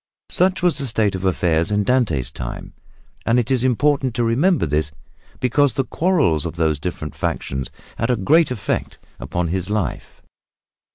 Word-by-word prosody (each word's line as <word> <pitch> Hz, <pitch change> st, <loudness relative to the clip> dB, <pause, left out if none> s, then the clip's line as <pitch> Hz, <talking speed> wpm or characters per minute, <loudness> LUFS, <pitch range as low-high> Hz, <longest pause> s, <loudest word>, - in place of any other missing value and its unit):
Such 185 Hz, 0 st, +2 dB
was 175 Hz, -5 st, +3 dB
the 140 Hz, -, -1 dB
state 110 Hz, -3 st, +1 dB
of 95 Hz, 0 st, -4 dB
affairs 85 Hz, -2 st, +1 dB
in 105 Hz, 0 st, +1 dB
Dante's 100 Hz, -, +1 dB
time, -, -, -7 dB, 0.5 s
and 115 Hz, -, +2 dB
it 125 Hz, +1 st, 0 dB
is 130 Hz, -2 st, +2 dB
important 130 Hz, 0 st, +1 dB
to 120 Hz, -, +1 dB
remember 140 Hz, +10 st, +2 dB
this, 75 Hz, +1 st, 0 dB, 0.5 s
because 140 Hz, +2 st, +2 dB
the 135 Hz, -, 0 dB
quarrels 140 Hz, -, +1 dB
of 85 Hz, -, -5 dB
these 80 Hz, -3 st, +1 dB
different 75 Hz, -2 st, -5 dB
factions 65 Hz, -1 st, -3 dB, 0.3 s
had 115 Hz, -, 0 dB
a 125 Hz, -, +3 dB
great 150 Hz, -, +3 dB
effect 125 Hz, -6 st, -3 dB, 0.2 s
upon 85 Hz, +6 st, -2 dB
his 95 Hz, +2 st, -2 dB
life. 105 Hz, -2 st, -3 dB
110 Hz, 165 wpm, -21 LUFS, 85-135 Hz, 0.5 s, was